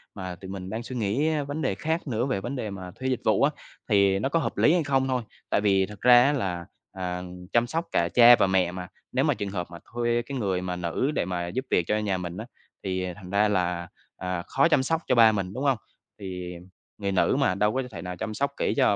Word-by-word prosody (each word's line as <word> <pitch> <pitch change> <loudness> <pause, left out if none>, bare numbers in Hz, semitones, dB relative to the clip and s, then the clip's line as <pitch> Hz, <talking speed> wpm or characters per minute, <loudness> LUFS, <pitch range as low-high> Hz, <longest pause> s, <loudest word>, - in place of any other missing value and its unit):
mà 95 -3 -5
tụi 95 +2 -11
mình 95 -1 -6
đang 110 +3 -4
suy 130 - -7
nghĩ, 120 +6 0
a, 150 -2 0
vấn 145 +3 -4
đề 130 -9 0
khác 160 - -2
nữa 120 -1 0
về 130 -8 -1
vấn 120 +7 -4
đề 115 -5 -3
mà 95 -2 -7
thuê 130 - -4
dịch 125 -2 -1
vụ 110 +2 +3
á, 145 - +4 0.4
thì 100 -2 +4
nó 120 - 0
có 165 - +2
hợp - - -3
lý 155 - +5
hay 175 -2 +2
không 135 -2 +1
thôi. 130 -1 0 0.3
Tại - - +2
vì 95 -2 +3
thực 105 -1 -12
ra 120 0 +8
á 145 - +3
là, 90 -10 -2 0.3
à, 90 -1 -4 0.3
chăm 120 0 +3
sóc 165 +6 -2
cả 85 0 +2
cha 120 +3 +8
và - - +4
mẹ 95 -2 +2
mà, 90 0 -6 0.2
nếu - - +1
mà - - +3
trường 100 - -4
hợp 90 -3 -4
mà 85 - -8 0.2
thuê 120 0 +1
cái 140 +2 -5
người 95 -6 -1
mà 90 -1 -3
nữ 90 - -1
để 150 - -1
mà 90 -1 -3
giúp 130 +9 -3
việc 90 - +3
cho 105 - +1
nhà 100 -3 0
mình 90 -1 -5
á, 110 - -5 0.4
thì 95 -1 -2
thành 95 -3 -11
ra 100 +2 +3
là, 90 -3 0 0.3
à, 90 -1 -3
khó - - +3
chăm 145 -5 +3
sóc 165 +4 0
cho - - +3
ba 115 -2 +7
mình, 95 -3 -3
đúng 130 +5 -3
không? 135 -3 +3 0.4
Thì 90 -2 -6 0.4
người 100 -1 -2
nữ 95 +6 +2
mà 130 -10 +2
đâu 105 +2 +2
có 130 +1 0
thể 85 -5 -7
nào 90 +1 -5
chăm 110 +5 -4
sóc 140 +5 -1
kỹ - - 0
cho 130 -7 +4
105 Hz, 265 wpm, -26 LUFS, 90-130 Hz, 0.4 s, ra